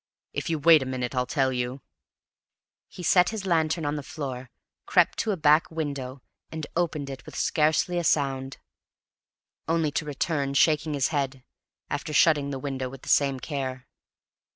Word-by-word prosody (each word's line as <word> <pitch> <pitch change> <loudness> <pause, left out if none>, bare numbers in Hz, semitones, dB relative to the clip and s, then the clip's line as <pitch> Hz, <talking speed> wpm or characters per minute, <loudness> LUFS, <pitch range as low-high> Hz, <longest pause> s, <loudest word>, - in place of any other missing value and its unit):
If - - -3
you 165 - 0
wait 155 0 +6
a 130 - -3
minute 125 -1 -3
I'll 125 -1 0
tell 135 -3 +1
you." 125 +2 -3 1.0
He 180 - -10
set 180 +1 +5
his 220 -3 -5
lantern 160 -2 +1
on 145 +1 -1
the - - -4
floor, 130 -4 -6 0.4
crept - - +3
to 225 - -1
a 195 - -1
back 150 +1 +4
window, 140 -5 -5 0.3
and 160 -1 -5
opened 160 -4 -1
it 135 - -8
with - - -10
scarcely 160 +3 +1
a - - -2
sound: 135 -4 0 1.1
only 165 -2 +1
to 150 - -1
return, 145 -1 -2
shaking 150 +1 +3
his 135 -2 +1
head, 135 -4 -2 0.4
after 150 +2 -4
shutting 150 -3 +4
the 135 - -3
window 130 -2 -4
with 135 0 -12
the - - -8
same 140 -2 +3
care. 130 -3 -4
145 Hz, 170 wpm, -26 LUFS, 135-160 Hz, 1.1 s, wait